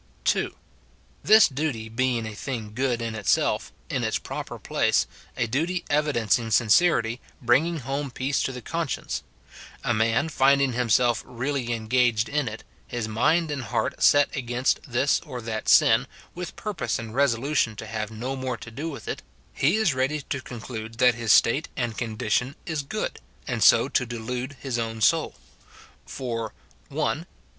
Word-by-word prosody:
(2.) - - +1 0.7
This 220 0 +7
duty 135 -5 -3
being 120 0 0
a 110 - -5
thing 110 -2 -5
good 125 -1 0
in 115 -1 -3
itself, 110 -2 +1 0.2
in - - -2
its - - +1
pro - - -5
per - - -9
place, - - +1 0.3
a 120 - +1
duty 165 +10 -1
evidencing 120 -6 +2
sincerity, 115 - +3 0.2
bringing 145 +7 +2
home 135 +3 -3
peace 130 +3 -1
to - - -1
the 125 -2 -8
conscience; 165 0 -3 0.6
a 120 - +1
man 115 +6 +2
finding 140 -3 +3
himself 120 -1 +2
really 125 0 -3
engaged 115 0 +2
in 150 -2 0
it, 105 +1 -6 0.2
his 120 -2 -3
mind 155 +9 +2
and 135 -4 -3
heart - - -2
set 145 -1 +5
against 125 -1 0
this 130 +3 +2
or 135 -6 -7
that 110 -2 -3
sin, - - +6 0.3
with 180 0 -6
purpose 210 -4 -2
and 115 -1 -7
resolution 135 -2 +1
to - - -7
have 110 -1 -4
no 120 +5 -4
more 130 -2 -3
to 115 - -10
do 145 +8 -4
with 140 - -8
it, - - -3 0.2
— - - -34
he 155 +8 +5
is 215 -8 +2
ready 135 +4 0
to 130 - -1
conclude 115 -2 -7
that 125 -1 +5
his 115 -2 0
state 135 +10 +4
and 120 -3 -1
con 110 -2 -4
dition 125 +4 0
is 160 -3 -2
good, 140 - -4 0.3
and - - 0
so - - +6
to 125 - 0
delude 125 +4 -4
his 130 -3 -2
own 115 -1 -3
soul. 110 - +2 0.7
For, 115 -4 -4 0.2
— - - -33
[1. - - -1
125 Hz, 170 wpm, -25 LUFS, 115-140 Hz, 0.7 s, This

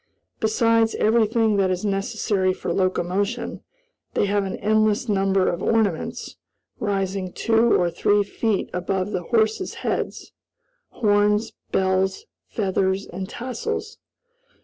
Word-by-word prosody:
Besides 225 +1 +2
everything 220 -1 +2
that 195 -1 +2
is 185 +2 -2
necessary 195 -1 0
for - - -3
locomotion, 195 +5 -1 0.5
they - - +2
have 200 0 +1
an 190 - -3
endless 215 +2 +2
number 195 -2 +2
of 175 - -1
ornaments, 215 -7 -1 0.4
rising 195 -2 -2
two 230 +3 +3
or 175 -1 +1
three 205 +4 +2
feet 210 0 -1
above 185 +2 -1
the 185 -3 -2
horses' 220 - 0
heads - - -2 0.6
horns, 210 0 +2 0.2
bells, 190 - +1 0.2
feathers, 190 -2 0
and 190 +1 -6
tassels. 430 - -4
205 Hz, 115 wpm, -23 LUFS, 190-225 Hz, 0.6 s, two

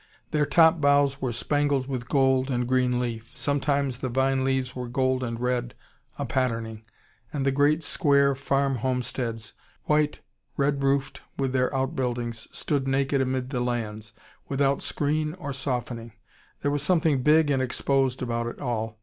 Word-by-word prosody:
Their 150 -1 +2
top 160 -2 +5
boughs 140 -1 +3
were 130 - -1
spangled 145 +2 0
with 125 -3 -4
gold 130 -1 +3
and 125 -2 0
green 125 -1 +2
leaf. 115 -2 -4
Sometimes 140 -2 0
the 130 - -2
vine 130 +1 +1
leaves 130 -1 -1
were 125 -1 -4
gold 130 +1 0
and 115 -1 -3
red, 125 -1 -1 0.4
a - - -2
patterning. 115 -4 -2 0.5
And 140 -2 -2
the 135 - +3
great 145 +4 +2
square 140 -3 +3
farm 135 0 0
homesteads, 120 -2 -3 0.3
white, 150 0 +1 0.4
red 140 0 +1
roofed, 135 0 0 0.2
with 135 -2 -1
their 130 -1 +2
out 135 0 -1
buildings, 120 -3 -3
stood 140 -3 -2
naked 135 +1 +1
amid 130 0 -1
the 125 - -1
lands, 115 -3 -3 0.4
without 140 0 +1
screen 155 +2 -1
or 145 -7 -5
softening. 120 -4 -4 0.5
There 145 - +1
was 145 -1 -1
something 155 -4 +2
big 150 +2 +4
and 135 -2 +2
exposed 130 0 0
about 120 -1 -2
it 120 - -6
all. 115 -4 -3
130 Hz, 160 wpm, -26 LUFS, 125-140 Hz, 0.5 s, top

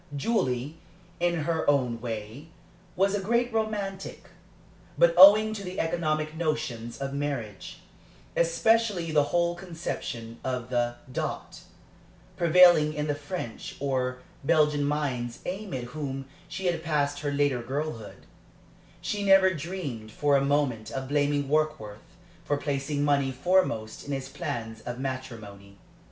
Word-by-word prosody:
Julie, 140 - -1 0.4
in 170 -2 +1
her 160 -1 0
own 125 -5 +1
way, 115 +5 -6 0.5
was 195 +2 +2
a 205 - 0
great 235 +4 +1
romantic; 205 -3 -3 0.7
but 170 0 +5
owing 210 +4 +9
to 205 -2 -6
the 185 0 -5
economic 155 -2 -1
notions 150 -8 -2
of 135 0 -4
marriage, 140 -9 -4 0.5
especially 185 0 +2
the 150 -2 +4
whole 170 +2 +1
conception 165 -10 -6
of 125 -1 -3
the 120 -1 0 0.2
dot, - - -4 0.7
prevailing 170 -3 +6
in 150 0 -1
the 150 - 0
French 145 -4 -6
or 125 -2 -1 0.2
Belgian 150 -1 +3
minds 130 -5 -2
amid 185 - -4
whom 135 +1 -5 0.2
she 190 +2 -6
had 170 -2 +1
passed 145 -3 0
her 145 -1 -2
later 140 -3 +1
girlhood, 135 -2 -5 0.8
she 205 - -2
never 195 -1 +6
dreamed 145 -10 -5
for 145 +4 +2
a 135 - +3
moment 140 -6 0
of 135 +1 -5
blaming 145 -1 +1
Warkworth 150 -5 -2 0.3
for 145 - 0
placing 145 0 -2
money 140 -2 +2
foremost 130 -7 0
in 145 - -2
his 135 0 -4
plans 115 -4 -5
of 120 +1 -6
matrimony. 115 -7 -7
145 Hz, 130 wpm, -27 LUFS, 125-170 Hz, 0.8 s, owing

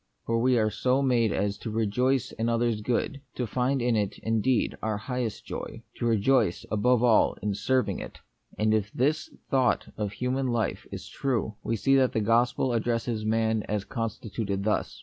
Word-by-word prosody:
For 115 0 +1
we 125 0 +3
are 110 -1 +2
so 130 +4 +1
made 120 -5 +3
as 100 0 -1
to - - -5
rejoice 115 +4 +1
in 115 +1 -2
others' 115 -2 +1
good, 125 +5 -1
to 125 - -1
find 125 +3 0
in 120 -1 +2
it, 105 -1 -1
indeed, 115 +2 +1
our 110 -1 -1
highest 120 0 -4
joy, - - -6
to 120 - -1
rejoice, 115 -2 +2
above 120 +3 +3
all, 115 -3 +4
in 105 -1 0
serving 130 +5 0
it. - - -8 0.4
And 110 0 +2
if 105 -1 0
this 150 +5 0 0.2
thought 130 -3 +2
of 105 -2 -2
human 130 +4 -1
life 120 -2 -1
is - - -7
true, 120 -5 -1
we 115 - -1
see 135 +5 +3
that 130 -1 +3
the - - +1
gospel 120 +3 +2
addresses 115 -1 -1
man 110 0 +1
as 105 -1 -1
constituted 110 -3 -3
thus. 105 +1 -1
115 Hz, 180 wpm, -27 LUFS, 110-125 Hz, 0.4 s, all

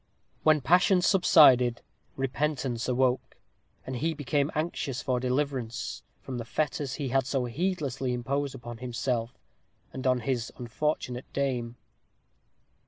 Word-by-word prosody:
When, 155 -1 +4
passion 180 +5 +4
subsided, 130 - +6 0.3
repentance 135 -2 -1
awoke, 125 0 0 0.5
and 130 - -4
he 160 +5 -1
became 145 0 0
anxious 150 -4 -2
for 125 -2 0
deliverance 130 -2 -2 0.2
from 130 -2 -5
the - - -3
fetters 145 +2 -2
he 140 -4 -3
had 135 0 +1
so 135 -2 0
heedlessly 135 -2 -2
imposed 135 +3 -2
on 120 -1 -7
himself, 120 -1 -2 0.6
and 130 0 -3
on 125 -1 +2
his 120 -1 -2
unfortunate 125 0 -3
dame. 125 -4 -1
130 Hz, 120 wpm, -28 LUFS, 125-145 Hz, 0.6 s, subsided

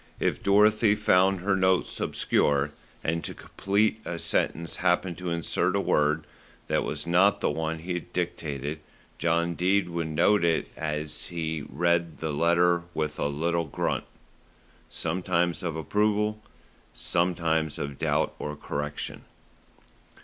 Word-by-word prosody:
If - - 0
Dorothy 105 +1 +4
found 95 -2 +3
her 95 +1 +2
notes 95 -1 +1
obscure, 70 0 +1 0.3
and 85 +1 -1
to - - -5
complete 105 +3 0
a 85 - -4
sentence 85 0 -1
happened 90 0 +1
to 90 -1 -3
insert 85 -1 0
a - - +2
word 75 +1 +1 0.4
that - - +1
was - - -4
not 90 +3 +4
the - - +1
one 80 +1 -2
he 90 +3 -4
had 90 0 -5
dictated, 75 -4 -3 0.4
John 85 0 +1
Dene 90 +1 +1
would 85 -1 -1
note 85 +6 +3
it 85 -2 +1
as 75 -1 -2
he 80 -3 -3
read 85 +2 +1
the 80 -2 -3
letter 85 +3 +3
with 75 -1 -2
a - - +1
little 85 +4 0
grunt, 70 - -2 0.8
sometimes 85 +1 -1
of 85 -3 -3
approval, 105 +5 0 0.5
sometimes 80 -3 0
of 70 -1 -5
doubt - - +1
or 75 0 -4
correction. 75 0 -5
85 Hz, 135 wpm, -27 LUFS, 80-90 Hz, 0.8 s, Dorothy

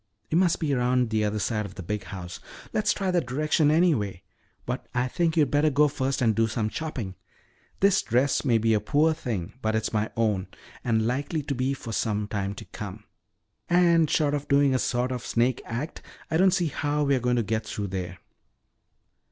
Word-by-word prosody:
"It - - +1
must 175 -1 +3
be 150 -4 0
around 125 -2 +1
the 110 -1 +1
other 105 0 0
side 105 +1 -1
of 95 - -14
the 95 - -7
big 105 +4 -3
house. 90 -2 -7 0.3
Let's 210 -1 +2
try 195 -2 -1
that 175 -7 0
direction 150 +3 +2
anyway. 150 - +2 0.4
But 125 +1 -4
I 125 +1 +1
think 165 +4 0
you'd 150 -4 +3
better 145 +1 +3
go 150 +1 +4
first 135 -2 -1
and 110 -2 +4
do 115 +1 +2
some 110 -1 -2
chopping. 125 -12 -4 0.7
This 195 0 +4
dress 130 +4 +1
may 120 -5 +3
be 115 0 +2
a 105 - +3
poor 150 +9 +2
thing 110 - -4
but 110 -1 0
it's 110 - -1
my 110 0 0
own 105 -5 +1 0.4
and 110 -2 +1
likely 140 +6 -1
to 140 - -2
be 130 +1 0
for 115 - -8
some 105 -1 -1
time 100 -1 -3
to - - -9
come. 105 0 -8 0.7
And 170 -3 +4
short 150 -2 +2
of 145 -1 -2
doing 140 -1 +4
a 130 - +2
sort 125 +1 0
of 125 -2 -4
snake 120 +1 +1
act, 125 +7 -5 0.3
I 160 - +3
don't 190 +2 +5
see 175 -3 +1
how 150 +1 -1
we're 140 -2 +2
going 125 0 +1
to 120 - +1
get 110 +1 -2
through 105 -2 -4
there." 90 -1 -4
125 Hz, 205 wpm, -26 LUFS, 110-150 Hz, 0.7 s, don't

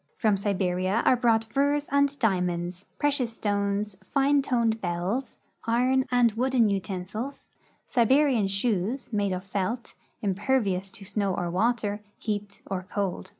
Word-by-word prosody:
From 215 -3 +3
Siberia 190 0 0
are - - +6
brought 230 -2 +3
furs 285 +5 0
and 280 0 +2
diamonds, 180 -4 -1
precious 270 -6 0
stones, 205 -1 -1
fine 280 +6 +2
toned 235 -4 +1
bells, 180 +9 -2 0.3
iron 255 +3 +2
and 245 -2 +4
wooden 240 0 +2
utensils, 200 +6 -4 0.3
Siberian 255 -2 +3
shoes, 215 +4 -1
made 205 -2 +1
of 185 0 -3
felt, 200 +5 -3 0.3
impervious 200 -1 0
to 195 - -9
snow 200 -1 -1
or 175 -1 -2
water, 210 +1 0 0.2
heat 205 -2 -4
or 190 -2 -3
cold. 195 0 -3
210 Hz, 130 wpm, -27 LUFS, 195-250 Hz, 0.3 s, are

